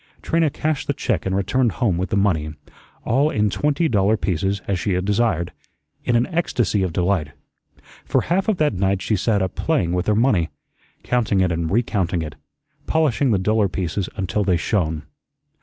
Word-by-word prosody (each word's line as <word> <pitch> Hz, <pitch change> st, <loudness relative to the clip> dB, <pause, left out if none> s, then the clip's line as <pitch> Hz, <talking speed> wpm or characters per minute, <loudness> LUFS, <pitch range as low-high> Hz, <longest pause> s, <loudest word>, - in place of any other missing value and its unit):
Trina 165 Hz, -1 st, +2 dB
cashed 155 Hz, +1 st, -2 dB
the 145 Hz, -, +1 dB
check 100 Hz, -8 st, -1 dB
and 95 Hz, -, 0 dB
returned 115 Hz, +5 st, +1 dB
home 110 Hz, -8 st, +1 dB
with 95 Hz, -, -2 dB
the 105 Hz, -, 0 dB
money 80 Hz, -7 st, 0 dB, 0.5 s
all 140 Hz, +6 st, +2 dB
in 105 Hz, -6 st, +1 dB
twenty 150 Hz, -, +1 dB
dollar 105 Hz, -3 st, +2 dB
pieces 95 Hz, +2 st, -1 dB
as 95 Hz, -3 st, 0 dB
she 95 Hz, +2 st, -1 dB
had 90 Hz, +1 st, -1 dB
desired 105 Hz, -5 st, 0 dB, 0.5 s
in 120 Hz, -, +1 dB
an 120 Hz, +1 st, +3 dB
ecstasy 120 Hz, -, +1 dB
of 95 Hz, -2 st, 0 dB
delight. 85 Hz, -4 st, 0 dB, 0.7 s
For -, -, +1 dB
half 190 Hz, +5 st, 0 dB
of 215 Hz, -4 st, +1 dB
that 150 Hz, -5 st, +2 dB
night 95 Hz, 0 st, 0 dB
she 110 Hz, -, +1 dB
sat 100 Hz, +1 st, +1 dB
up 95 Hz, -, -3 dB
playing 100 Hz, -, 0 dB
with 90 Hz, 0 st, -1 dB
her 105 Hz, -, +3 dB
money, 105 Hz, -8 st, +2 dB, 0.5 s
counting 115 Hz, -5 st, +1 dB
it 90 Hz, -1 st, +2 dB
and 85 Hz, -1 st, -1 dB
recounting 95 Hz, -5 st, 0 dB
it, 75 Hz, -, -6 dB, 0.5 s
polishing 145 Hz, -4 st, +2 dB
the 105 Hz, -, +3 dB
duller 105 Hz, +2 st, +2 dB
pieces 90 Hz, +1 st, -2 dB
until 95 Hz, +2 st, -1 dB
they 90 Hz, -3 st, +2 dB
shone. 80 Hz, -5 st, -1 dB
100 Hz, 185 wpm, -21 LUFS, 90-120 Hz, 0.7 s, an